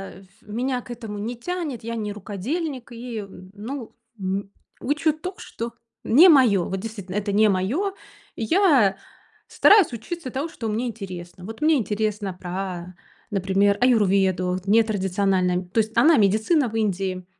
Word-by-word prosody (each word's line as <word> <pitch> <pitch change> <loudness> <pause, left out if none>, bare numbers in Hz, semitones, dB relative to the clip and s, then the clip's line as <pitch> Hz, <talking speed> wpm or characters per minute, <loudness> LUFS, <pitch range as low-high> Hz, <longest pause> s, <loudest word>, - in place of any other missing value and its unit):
э, - - -13
ф - - -18 0.2
меня 245 +4 -2
к 245 - -11
этому 225 -3 -7
не 230 +4 -4
тянет, 305 - -4
я 230 +1 -4
не 210 -2 -3
рукодельник 240 - -4
и 235 -2 -6 0.3
ну, 230 +4 -7 0.2
м, 195 +1 -3 0.3
учу 300 +3 +1
то, 360 +5 -6
что 230 0 -6 0.3
не 330 +10 +7
моё. 235 - +5
Вот, 190 0 -2
действительно, 200 -3 -7
это 205 0 -1
не 215 +1 +4
моё. 260 - 0 0.4
Я 255 - +3 0.5
стараюсь 400 - +5
учиться 265 +6 -6
тому, 280 +7 -3
что 225 - -6
мне 230 +4 -1
интересно. 180 -5 -8
Вот 225 +7 -9
мне 315 +1 +4
интересно 210 -3 -2
про, 180 0 -6 0.4
например, 195 +1 +2
аюрведу 190 -6 +2
нетрадициональная 195 -4 +2
То 180 +5 -2
есть 220 +1 -1
она 320 -1 +6
медицина 220 - +3
в 220 - -8
Индии. 190 -4 -1
215 Hz, 150 wpm, -23 LUFS, 195-250 Hz, 0.5 s, не